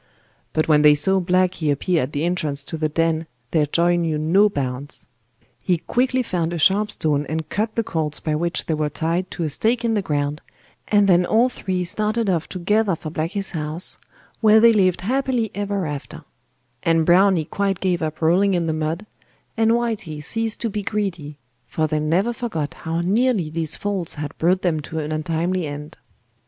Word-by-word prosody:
But 155 - +1
when 150 -2 +5
they 150 0 +7
saw 190 +6 +3
Blacky 180 -3 +1
appear 165 +4 +1
at 130 +3 -3
the 145 0 -2
entrance 155 -5 -1
to 160 - -6
the 155 -1 -1
den 165 +1 0 0.2
their 155 -3 +2
joy 175 +3 +2
knew 165 -3 0
no 180 +7 +4
bounds. 135 -4 -5 0.6
He 180 -2 +1
quickly 255 +8 0
found 175 -6 -2
a - - -2
sharp 200 +6 +3
stone 145 -6 0
and 160 0 -3
cut 215 +1 -2
the 230 - +1
cords 155 -6 -3
by 155 - -2
which 170 +3 -1
they 160 - -1
were 150 -1 -1
tied 170 +5 -1
to 170 - -4
a 155 - -1
stake 235 - +1
in 230 - +1
the 210 - +1
ground, 145 -2 -2 0.5
and 205 -1 +4
then 180 -1 +5
all 230 +7 +3
three 185 -6 -3
started 215 +3 0
off 170 -2 -1
together 195 +2 +1
for 155 -1 -7
Blacky's 180 +6 -3
house, 155 +1 -2 0.4
where 220 -1 +6
they 230 +1 +6
lived 185 -4 +2
happily 250 0 0
ever 200 -2 -2
after; 150 +2 -6 0.6
and 165 -1 +2
Browny 180 -1 +4
quite 195 +2 -1
gave 180 -2 0
up 155 0 -3
rolling 185 +4 +3
in 170 -1 0
the 160 - 0
mud, 160 +5 -2 0.5
and 225 -1 +2
Whitey 225 -9 -1
ceased 225 +8 -2
to 230 - 0
be 210 - -2
greedy, 185 -8 -3 0.3
for 160 - -1
they 155 0 0
never 175 +10 +1
forgot 220 - -3
how 165 +1 -3
nearly 200 -2 +1
these 160 -1 -2
faults 195 -5 -2
had 150 +1 -6
brought 180 +3 +2
them 165 -4 +1
to 155 +2 -7
an 155 -1 -3
untimely 165 +3 -1
end. 145 +1 -8
170 Hz, 190 wpm, -22 LUFS, 155-200 Hz, 0.6 s, they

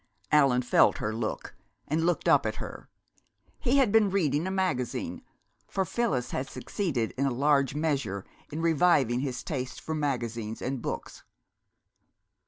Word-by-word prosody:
Allan 135 -4 +4
felt 120 - +4
her 105 - -2
look, 110 -1 -4 0.3
and 160 +3 +1
looked 175 - 0
up - - +5
at - - -2
her. - - -8 0.7
He 265 0 +2
had 260 -7 +4
been 220 -2 +5
reading 165 -4 +1
a - - -1
magazine, 185 -11 -1 0.5
for 190 - -1
Phyllis 155 - -1
had 135 +1 -3
succeeded 140 - -2
in 140 - +2
a - - 0
large 140 +1 +2
measure 140 -11 -1 0.3
in 160 +2 -3
reviving 150 -7 +3
his 130 -2 -3
taste 130 -4 -4
for 160 - -4
magazines 120 -7 -2
and 130 -1 -3
books. - - -5
140 Hz, 150 wpm, -28 LUFS, 125-170 Hz, 0.7 s, up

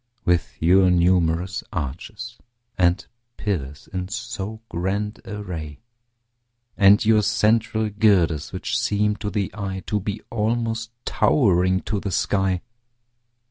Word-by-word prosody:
With 90 -1 +1
your 90 +3 +5
numerous 90 0 +2
arches 100 - -6 0.4
and 90 0 +2 0.3
pillars 75 -9 -3
in 90 -1 -3
so 110 -1 -5
grand 100 +4 -3
array 90 -9 -6 1.0
And 100 +2 +6
your 110 -1 +5
central 110 +1 +2
girders, 95 -8 +2
which - - -2
seem 105 0 +1
to 105 - -3
the 100 -2 -2
eye 95 -3 -4
To 105 - 0
be 105 +2 -4
almost 115 0 -1 0.2
towering 95 - +3
to 105 -1 -2
the 100 - -4
sky. 95 0 0
100 Hz, 115 wpm, -23 LUFS, 90-110 Hz, 1.0 s, And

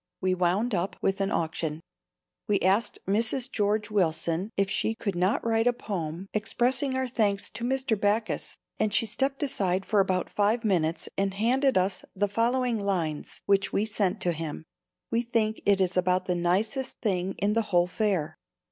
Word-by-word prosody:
We 185 -1 +1
wound 185 +6 +1
up 185 +1 -1
with 195 0 +1
an 195 - +1
auction. 160 -4 -2 0.7
We 210 -2 +2
asked 200 +4 +2
Mrs. 230 +6 +1
George 210 0 0
Willson 170 -1 0
if 195 0 +2
she 220 +3 0
could 205 -3 -3
not 185 +6 +1
write 225 0 +2
a 245 - +4
poem 175 -6 -4
expressing 250 +5 +1
our 260 0 0
thanks 210 -5 0
to 235 - -6
Mr. 260 -4 0
Backus 215 +2 0 0.2
and 215 - +1
she 220 - +3
stepped 270 +6 -1
aside 195 -8 0
for 210 - +2
about 185 -2 +1
five 215 +3 +1
minutes 170 -5 +1
and 195 -1 0
handed 255 +5 +2
us 185 0 +1
the 205 +2 +1
following 235 +3 +1
lines 175 -7 -2
which 195 -1 +2
we 205 - +1
sent 205 -4 0
to 175 - +2
him. 160 -2 -5 0.5
We 230 0 +2
think 225 -2 0
it 200 -1 +4
is 185 -1 +1
about 185 0 +2
the 180 - 0
nicest 200 +9 0
thing 190 -3 -1
in 205 +1 +1
the 230 - +2
whole 175 -2 +4
fair. 185 -4 -1
200 Hz, 175 wpm, -27 LUFS, 185-230 Hz, 0.7 s, a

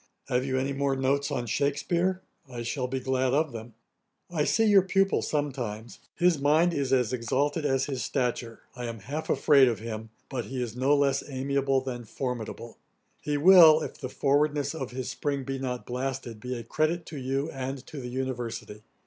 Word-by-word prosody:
Have 125 +1 +1
you 130 -1 -1
any 135 +1 -1
more 140 0 0
notes 140 +2 +1
on 130 -4 -2
Shakspeare? 170 - 0 0.3
I 120 -2 -6
shall 125 +2 -2
be 130 +1 -2
glad 130 0 +1
of 155 0 +1
them. 115 -1 -9 0.6
'I 155 -4 +1
see 225 - +3
your 205 -2 +6
pupil 195 +1 +2
sometimes: 125 -7 -3 0.2
his 175 -4 +3
mind 160 +5 +4
is 140 -4 -1
as 125 -3 +2
exalted 145 +6 0
as 135 0 +1
his 135 -3 -3
stature. 120 -3 -2
I 125 -1 -5
am 115 -2 -6
half 145 +9 -5
afraid 140 -3 +5
of 115 -3 0
him; 110 +1 -6 0.2
but 125 -4 -4
he 130 +4 -5
is 120 -2 -3
no 135 +3 +3
less 140 -1 +2
amiable 135 0 0
than 125 -2 -5
formidable. 115 -1 -5 0.4
He 150 -1 -1
will, 160 -1 +8
if - - -6
the 130 - -5
forwardness 145 +2 +1
of 135 -6 -4
his 130 0 -4
spring 140 -2 -2
be 135 +1 -4
not 125 -2 -4
blasted, 125 -2 -4
be 125 +3 -4
a 115 - -6
credit 155 +7 0
to 155 - -8
you, 135 +4 -2
and 135 0 -5
to 145 - -8
the 125 - -6
University. 120 -4 -4
135 Hz, 190 wpm, -28 LUFS, 125-145 Hz, 0.6 s, will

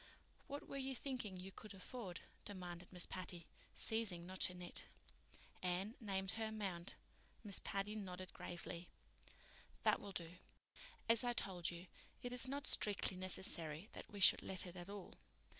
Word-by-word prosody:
"What 285 +1 -4
were 275 - -3
you 265 -1 -1
thinking 240 -8 -2
you 190 +2 -6
could 210 +2 -8
afford?" 190 -2 -4 0.2
demanded 180 -3 -5
Miss 180 -1 +1
Patty, 180 -2 -4 0.3
ceasing 205 -6 +1
not 185 +1 -6
to 180 - +5
knit. 180 -1 +2 0.8
Anne 185 +4 +1
named 195 -3 0
her 225 0 0
amount. 195 -5 -2 0.5
Miss 205 -3 +2
Patty 200 +1 0
nodded 185 -3 -4
gravely. 175 0 -5 1.0
"That - - +6
will 200 - -5
do. 170 -1 -2 0.7
As 230 +1 +6
I 245 0 +3
told 180 -7 -1
you, 170 +1 -6 0.4
it 245 0 -2
is 250 +1 +5
not 280 +2 -2
strictly 200 -2 +5
necessary 180 -2 0
that - - -7
we 205 - -5
should 190 - +9
let 190 0 +3
it 180 0 -7
at 175 +1 -6
all. 200 -2 -6
190 Hz, 160 wpm, -43 LUFS, 180-220 Hz, 1.0 s, should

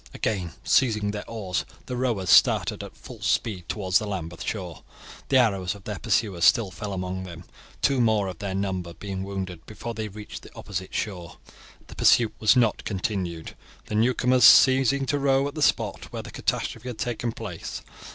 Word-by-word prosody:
Again 95 -6 -2
seizing 105 -5 +2
their 105 0 -6
oars, 100 -6 -2 0.2
the 125 - -4
rowers 120 -7 0
started - - +4
at - - -11
full - - -12
speed 95 -7 -1
towards 95 -1 +1
the 105 - -5
Lambeth 85 -4 -5
shore. 90 -6 -5 0.5
The 135 - +5
arrows 100 -7 +2
of 100 - -14
their 105 -1 -5
pursuers 100 -5 0
still 105 -2 +5
fell 105 +1 -6
among 95 0 -3
them, 85 -2 -9 0.4
two 135 -3 +3
more 110 -4 +2
of 90 -3 -7
their 100 -2 -3
number 95 -3 -3
being 95 -2 -5
wounded 95 -4 -5
before 115 +2 -6
they 110 -1 -4
reached 105 +1 -9
the - - -15
opposite 95 -2 -6
shore. 90 -5 -4 0.5
The - - -12
pursuit 115 -3 +4
was 110 +4 +5
not 120 -4 +2
continued, 90 -5 -3 0.3
the - - -7
newcomers 125 +3 +3
ceasing 135 +1 +7
to 145 +2 0
row 135 0 +2
at 145 - -6
the 155 - -5
spot - - +1
where - - -5
the - - -10
catastrophe 125 - -2
had 120 - -6
taken 120 -1 -2
place. - - -7
105 Hz, 180 wpm, -25 LUFS, 95-120 Hz, 0.5 s, ceasing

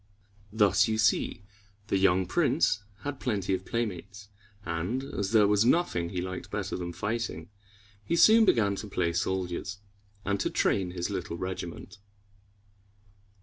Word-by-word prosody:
Thus 105 -1 +4
you 110 0 0
see 105 -2 +1 0.4
the 100 - 0
young 95 -1 +3
prince 135 - +1 0.2
had 145 -1 -5
plenty 100 -6 -1
of 95 0 -3
playmates; 100 -3 -4 0.4
and, 90 +11 -2
as 100 -8 -3
there 110 -3 +5
was 105 +1 +3
nothing 120 - +1
he 90 -1 -3
liked 90 0 -6
better 105 0 -3
than 90 -1 -4
fighting, 105 -4 -3 0.5
he 135 - -1
soon 220 +6 +7
began 110 - +3
to 105 - -6
play 85 -4 -1
soldiers, 95 +2 -2 0.5
and 100 -1 0
to - - 0
train 95 -3 +1
his 90 +2 -4
little 90 -3 -4
regiment. 90 0 -6
100 Hz, 145 wpm, -28 LUFS, 90-110 Hz, 0.5 s, soon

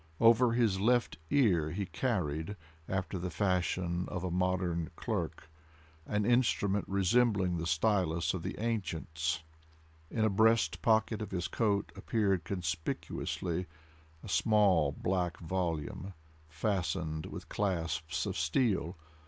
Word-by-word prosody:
Over 115 +1 +6
his 115 -5 +2
left 120 -4 +2
ear, 90 - +3
he 100 +5 -3
carried, 90 - -2 0.3
after 95 0 -2
the 90 +1 -3
fashion 90 -1 0
of 90 -3 -4
a 90 - -2
modern 90 -2 0
clerk, 85 -8 -3 0.6
an 105 0 0
instrument 110 -4 +2
resembling 100 -2 +2
the 80 0 -3
stylus 85 -1 +1
of 90 - -3
the - - -5
ancients. 85 -8 -2 0.7
In 110 -2 +1
a - - +4
breast 110 +3 +3
pocket 110 -1 +2
of 105 - -4
his 90 -2 -2
coat 100 -3 0
appeared 100 -5 0
conspicuously 85 0 -3 0.6
a - - -8
small 100 -8 +3
black 90 +2 -1
volume 90 +1 -3 0.3
fastened 80 -2 -2
with - - -8
clasps 80 -5 -1
of 95 - -3
steel. 90 - +1
95 Hz, 120 wpm, -32 LUFS, 85-105 Hz, 0.7 s, Over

